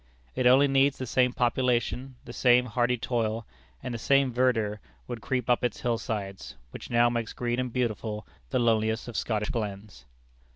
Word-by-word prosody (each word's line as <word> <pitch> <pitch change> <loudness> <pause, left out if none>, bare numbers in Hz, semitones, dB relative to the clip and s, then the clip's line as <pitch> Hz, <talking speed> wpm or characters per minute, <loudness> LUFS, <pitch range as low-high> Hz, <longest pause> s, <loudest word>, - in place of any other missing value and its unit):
It 130 - +2
only 135 +3 +6
needs 135 0 +3
the 130 - -4
same 125 +1 +2
population, 125 +1 0
the 120 - -9
same 125 0 +4
hardy 120 +1 0
toil: 115 -2 -2 0.4
and 125 - -4
the 115 - -4
same 135 +1 +3
verdure 115 -4 +1 0.3
would 120 -2 -6
creep 125 +3 -2
up 125 0 +2
its 125 - -1
hill 120 -2 0
sides, 100 -3 -5 0.2
which - - -9
now 120 0 +4
makes 120 -2 -2
green 120 0 -2
and 125 -1 -2
beautiful 110 -3 -2 0.2
the - - 0
loneliest 110 -2 +1
of 120 - -7
Scottish 105 -2 -1
glens. 100 - -5
120 Hz, 175 wpm, -27 LUFS, 110-125 Hz, 0.4 s, only